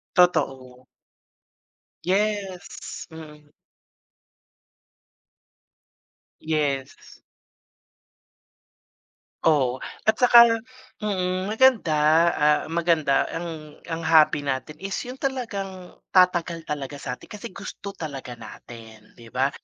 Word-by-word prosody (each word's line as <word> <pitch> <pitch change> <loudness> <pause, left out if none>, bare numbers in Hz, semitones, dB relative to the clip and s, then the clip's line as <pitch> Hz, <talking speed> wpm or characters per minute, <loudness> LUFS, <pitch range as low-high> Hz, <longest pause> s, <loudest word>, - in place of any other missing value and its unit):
Totoo. 130 -8 +1 1.2
Yes. 195 0 -2
Mm. 150 -2 -12 2.9
Yes. 145 -4 -3 2.2
Oo, 130 -5 +2 0.2
at 220 - +5
saka, 235 -2 +7 0.4
mm, 185 -2 -1
maganda, 225 -7 +4 0.4
ah, 150 -2 +2
maganda 165 -4 +2
ang 160 -3 -6 0.2
ang 165 0 -4
hobby 155 -2 +4
natin 140 +3 -3
is 195 +3 -6 0.2
yung 255 - -7
talagang 200 -9 -5 0.2
tatagal 175 -2 +3
talaga 145 -2 -6
sa 125 -2 -4
atin, - - -15
kasi 210 - -9
gusto 200 +1 -8
talaga 140 -10 -7
natin, 110 0 -13
‘di 115 -1 -15
ba? 135 +2 +2
165 Hz, 85 wpm, -24 LUFS, 140-195 Hz, 2.9 s, saka